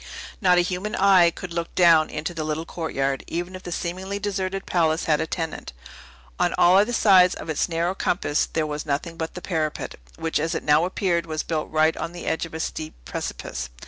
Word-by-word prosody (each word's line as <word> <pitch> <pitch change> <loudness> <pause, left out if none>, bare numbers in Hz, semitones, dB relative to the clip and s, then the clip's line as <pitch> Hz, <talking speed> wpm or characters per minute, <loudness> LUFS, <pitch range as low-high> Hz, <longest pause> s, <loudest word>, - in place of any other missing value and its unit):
Not 180 -3 +5
a - - +6
human 180 +4 -3
eye 190 -3 +6
could 170 +1 -8
look 170 0 -4
down 165 -3 +5
into 155 +3 -4
the 160 -2 -3
little 155 +1 -3
courtyard, 140 -6 -2
even 175 +2 -4
if 185 - -8
the 175 - -7
seemingly 185 +4 -3
deserted 195 -1 -3
palace 165 -2 +1
had 150 -2 +2
a - - -2
tenant. 160 - -4 0.7
On - - +2
all 175 +1 +6
other 210 +4 +2
sides 190 -6 +5
of 160 - -5
its 155 - 0
narrow 170 +2 0
compass 175 -5 0
there 160 -1 0
was 150 0 -4
nothing 155 +3 -2
but 160 0 -5
the 180 - -7
parapet, 155 - -3 0.2
which 165 -1 -1
as 160 +2 -1
it - - -3
now 150 +3 +4
appeared 175 -2 0
was 155 -1 -2
built 155 -2 -2
right 155 +1 +3
on 170 - -5
the 175 - -8
edge 160 +1 -1
of 160 - -11
a - - -4
steep 155 -1 -4
precipice. - - -5
170 Hz, 210 wpm, -24 LUFS, 155-180 Hz, 0.7 s, a